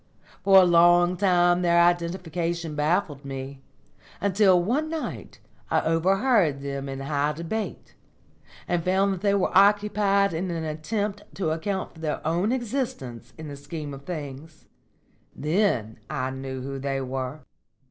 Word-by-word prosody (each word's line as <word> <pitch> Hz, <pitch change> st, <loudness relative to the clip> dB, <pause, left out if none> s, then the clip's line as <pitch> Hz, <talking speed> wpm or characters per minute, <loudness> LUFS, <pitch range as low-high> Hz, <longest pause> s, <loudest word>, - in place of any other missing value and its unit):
For 195 Hz, -1 st, +7 dB
a 185 Hz, -, +6 dB
long 175 Hz, +1 st, +5 dB
time 175 Hz, -2 st, +3 dB
their 170 Hz, -1 st, +3 dB
identification 170 Hz, -1 st, 0 dB
baffled 150 Hz, -1 st, 0 dB
me, 135 Hz, 0 st, -7 dB, 0.6 s
until 195 Hz, -2 st, +4 dB
one 260 Hz, -, 0 dB
night 320 Hz, -1 st, -6 dB, 0.3 s
I -, -, +2 dB
overheard 180 Hz, -, +2 dB
them 140 Hz, 0 st, -4 dB
in 135 Hz, 0 st, -5 dB
high 145 Hz, +1 st, 0 dB
debate, 170 Hz, +8 st, -5 dB, 0.7 s
and 175 Hz, -1 st, 0 dB
found 190 Hz, +1 st, +1 dB
they 200 Hz, +1 st, +2 dB
were 195 Hz, -, 0 dB
occupied 200 Hz, -1 st, +4 dB
in 180 Hz, +3 st, -2 dB
an 165 Hz, -2 st, -3 dB
attempt 200 Hz, +7 st, -3 dB
to 180 Hz, -5 st, -1 dB
account 190 Hz, +4 st, -3 dB
for 160 Hz, -, -15 dB
their 155 Hz, -2 st, -3 dB
own 175 Hz, +7 st, +1 dB
existence 235 Hz, -, -4 dB
in 160 Hz, -1 st, -8 dB
the 145 Hz, -, -7 dB
scheme 145 Hz, +1 st, -7 dB
of 135 Hz, -, -9 dB
things. 155 Hz, -1 st, -7 dB, 0.7 s
Then 150 Hz, -, 0 dB
I 130 Hz, 0 st, -2 dB
knew 130 Hz, -1 st, -6 dB
who 135 Hz, 0 st, -5 dB
they 135 Hz, 0 st, -2 dB
were." 130 Hz, +2 st, -4 dB
170 Hz, 140 wpm, -25 LUFS, 145-195 Hz, 0.7 s, For